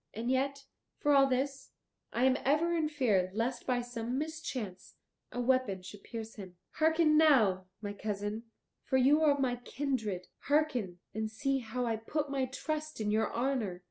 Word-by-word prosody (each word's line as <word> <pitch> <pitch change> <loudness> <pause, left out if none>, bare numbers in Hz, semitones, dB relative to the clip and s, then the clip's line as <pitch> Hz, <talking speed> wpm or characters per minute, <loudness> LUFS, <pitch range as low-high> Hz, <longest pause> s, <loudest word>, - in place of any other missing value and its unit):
And 235 +3 -1
yet, 275 +1 0 0.3
for 290 - +2
all 275 -1 +6
this, 270 +1 -2 0.4
I 240 - 0
am 260 0 +5
ever 315 +5 +2
in 315 -2 +1
fear 220 -11 +2
lest 240 +3 -2
by 250 -1 +2
some 245 0 -4
mischance 265 - -5 0.4
a 245 - -4
weapon 245 -7 +1
should 195 +2 -10
pierce 225 -1 -7
him. 185 -3 -9 0.2
Hearken 320 -1 +4
now, 215 -12 +4 0.2
my 205 0 -3
cousin, 205 +2 -3 0.4
for 260 - +1
you 280 +4 +5
are 300 -2 +5
of 285 - -4
my 250 -2 +1
kindred, 240 -8 -3 0.2
hearken, 280 - +1 0.2
and 220 +1 -2
see 270 +5 0
how 245 +1 -3
I 225 -2 0
put 285 +6 -3
my 270 -2 +1
trust 310 +3 -4
in 210 -1 0
your 220 +1 +1
honour. 235 -7 -1
250 Hz, 175 wpm, -32 LUFS, 220-280 Hz, 0.4 s, all